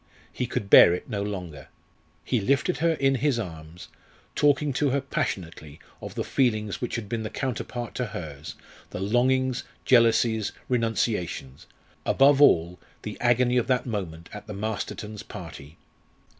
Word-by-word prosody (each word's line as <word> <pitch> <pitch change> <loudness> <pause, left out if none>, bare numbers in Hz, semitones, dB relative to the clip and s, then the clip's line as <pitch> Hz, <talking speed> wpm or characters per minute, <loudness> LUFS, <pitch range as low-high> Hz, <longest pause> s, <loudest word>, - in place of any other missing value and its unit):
He - - -2
could 100 - -3
bear 90 -2 +8
it - - -8
no 100 -2 -2
longer. 90 -9 -6 0.6
He 120 -4 0
lifted 140 - +1
her 165 +2 +2
in 135 -3 +2
his 135 -1 +1
arms, 85 -4 -8 0.4
talking 145 0 +2
to 140 +2 +1
her 140 +2 +1
passionately 85 - -4 0.2
of - - -8
the - - -2
feelings 110 -6 0
which 120 - -3
had 115 -3 -4
been 115 +2 -3
the 110 - -4
counterpart 120 -2 -4
to 125 - -1
hers, 75 -6 -7 0.3
the - - -6
longings, 125 +5 +1 0.2
jealousies, 115 -3 +3
renunciations 115 - -2 0.4
above 140 +1 +4
all, 85 - +4 0.2
the 105 - -5
agony 125 +1 +3
of 120 - +1
that 125 -2 +1
moment 90 -8 -5
at 105 0 -9
the 105 - -6
Mastertons' 105 0 -4
party. 75 +4 -10
110 Hz, 150 wpm, -26 LUFS, 90-130 Hz, 0.6 s, bear